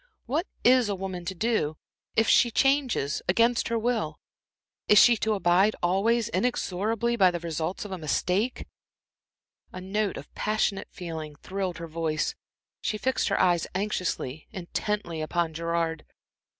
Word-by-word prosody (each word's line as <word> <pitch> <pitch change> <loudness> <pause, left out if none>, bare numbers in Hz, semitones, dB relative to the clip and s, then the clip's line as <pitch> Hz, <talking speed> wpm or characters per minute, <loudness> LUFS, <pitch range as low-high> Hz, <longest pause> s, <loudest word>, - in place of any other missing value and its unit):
What 305 - -1 0.2
is 250 -2 +5
a 200 - 0
woman 185 -2 -5
to 190 - -4
do, 175 -7 0 0.4
if 225 -1 +3
she 240 - +5
changes 265 - +1
against 230 +5 +3
her 230 - 0
will? 220 -10 -1 0.7
Is 210 - +6
she 240 +3 +8
to 215 0 0
abide 190 +3 +3
always, 215 +6 +2
inexorably, 225 +1 0
by 190 -5 +5
the 175 -1 -3
results 165 +3 -3
of 205 - -8
a 190 - -4
mistake?" 185 - 0 1.1
A 185 - -7
note 200 +2 -1
of 145 - -10
passionate 210 -2 0
feeling 160 -4 -7
thrilled 185 +2 -4
her 170 - -6
voice, 160 -1 -1 0.5
she 215 - -1
fixed 260 +4 0
her 195 - +1
eyes 175 -2 +3
anxiously, 180 -7 -2
intently, 185 -2 -3
upon 165 +1 -1
Gerard. 165 0 -1
190 Hz, 145 wpm, -27 LUFS, 170-220 Hz, 1.1 s, she